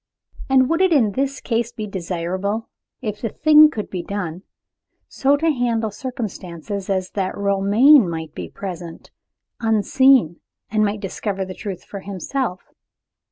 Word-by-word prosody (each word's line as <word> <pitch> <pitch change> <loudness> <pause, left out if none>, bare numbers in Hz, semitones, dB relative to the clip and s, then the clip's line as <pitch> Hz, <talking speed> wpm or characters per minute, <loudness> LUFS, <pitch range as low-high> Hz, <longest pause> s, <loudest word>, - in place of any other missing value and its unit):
And 260 -1 +5
would 330 +4 +1
it 375 -1 +4
in 245 -10 +4
this 275 +5 -2
case 235 0 -1
be 220 -2 -5
desirable 190 +3 -3 0.3
if 210 -2 -4
the 230 - -1
thing 305 +5 +6
could 215 -8 -6
be 185 - -3
done 180 -2 -5 0.7
so 280 +2 +2
to 325 +2 +2
handle 230 -4 0
circumstances 200 - -6
as 185 -1 -1
that 190 -2 -2
Romayne 200 - +5
might 160 -2 -5
be 85 -2 -7
present, 175 - -8 0.5
unseen, 225 - +3 0.3
and 215 0 +2
might 205 0 -1
discover 195 0 -3
the 185 - -7
truth 190 -2 -7
for 200 - -8
himself? 195 +2 -4
205 Hz, 145 wpm, -21 LUFS, 185-250 Hz, 0.7 s, thing